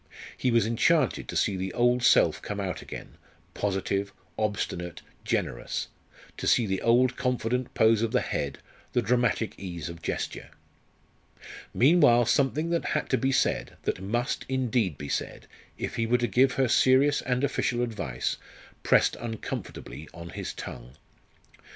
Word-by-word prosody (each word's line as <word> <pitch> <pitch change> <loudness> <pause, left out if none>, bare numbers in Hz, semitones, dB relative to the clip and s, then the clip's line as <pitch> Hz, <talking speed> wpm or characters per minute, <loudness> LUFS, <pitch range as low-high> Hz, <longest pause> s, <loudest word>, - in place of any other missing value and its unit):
He 130 - 0
was 115 -3 +3
enchanted 130 +5 +2
to - - -6
see 100 - +1
the 95 0 -3
old 120 +1 +3
self 120 - +4
come 105 0 -5
out 90 -5 -3
again - - -9 0.4
positive, 100 0 -1 0.2
obstinate, 95 -5 -3 0.2
generous; - - -2 0.5
to - - -3
see 120 - +4
the 95 -2 -2
old 125 +2 +3
confident 125 -1 -1
pose 110 0 +4
of 115 -1 0
the - - +2
head, 70 - -3 0.4
the 120 - +2
dramatic 120 -2 +1
ease 85 -4 -5
of 85 0 -9
gesture. - - -4 1.2
Meanwhile 120 -4 +5
something 145 +7 +1
that 170 - +1
had 150 - -1
to 130 - +4
be 135 0 +1
said, - - 0
that - - -2
must, 120 +7 -1
indeed, 125 - 0
be 70 - -6
said, - - -3 0.3
if - - -4
he 115 0 0
were 120 +2 +3
to 120 -1 0
give 125 +4 +3
her 135 -1 +2
serious 130 +4 +4
and 125 +1 -1
official 120 -3 0
advice, 90 - -3 0.4
pressed - - +3
uncomfortably 110 -8 -6
on 85 0 -8
his - - -5
tongue. 60 +1 -8
115 Hz, 150 wpm, -27 LUFS, 95-125 Hz, 1.2 s, Meanwhile